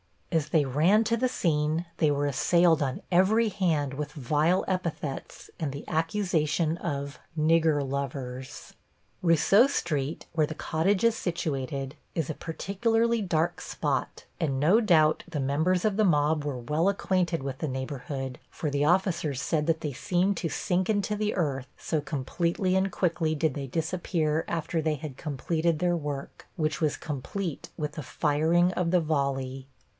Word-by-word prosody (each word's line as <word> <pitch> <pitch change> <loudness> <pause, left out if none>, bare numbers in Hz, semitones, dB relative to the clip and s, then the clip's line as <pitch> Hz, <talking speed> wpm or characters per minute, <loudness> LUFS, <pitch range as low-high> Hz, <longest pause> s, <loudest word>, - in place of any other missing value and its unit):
As 160 -4 +1
they 155 -2 +3
ran 165 - +4
to 230 +1 +1
the 255 +2 +2
scene 160 -5 0
they 155 - +3
were 145 0 +1
assailed 165 +4 +3
on 135 -2 -1
every 210 +6 +4
hand 160 -9 0
with 145 +2 -4
vile 155 +6 +1
epithets 170 -7 -4
and 155 -5 -1
the 140 +1 -8
accusation 165 -2 0
of 140 -5 -4 0.2
"Nigger 155 -2 +3
lovers." 130 0 -5 0.5
Rousseau 175 - +5
Street, 155 - -2
where 155 -2 +2
the 155 - -6
cottage 185 +7 0
is 230 -1 +4
situated, 140 - -3 0.2
is 160 -5 -1
a - - -3
particularly 225 +9 0
dark 175 -2 0
spot, - - -2 0.2
and 140 -6 0
no 175 +10 +5
doubt 160 -8 +3
the 160 -5 -3
members 160 +8 +1
of 210 -2 +1
the 215 - +4
mob 150 -3 +2
were 140 -3 -2
well 150 +9 0
acquainted 180 -5 0
with 135 -1 -4
the 155 - -2
neighborhood, 130 0 -4
for 150 - -3
the 145 +1 +1
officers 170 -5 +1
said 150 +2 0
that 160 -1 +1
they 150 -3 -3
seemed 185 +8 +1
to 165 - -2
sink 185 +4 0
into 210 0 +1
the 210 0 -1
earth, 135 -7 -1
so 160 - -1
completely 170 +6 -1
and 190 0 +2
quickly 170 -3 0
did 155 -1 +1
they 140 -1 -4
disappear 160 +1 -1
after 165 0 -1
they 155 -1 0
had 150 -3 -7
completed 160 +2 -1
their 175 +1 +1
work, 145 -3 -6
which 155 -3 -1
was 155 -2 +1
complete 160 +3 -4
with 150 -1 -2
the 155 - -6
firing 160 +5 +2
of 180 -2 -1
the 180 -1 +4
volley. 135 -3 -1
160 Hz, 160 wpm, -28 LUFS, 145-180 Hz, 0.5 s, Rousseau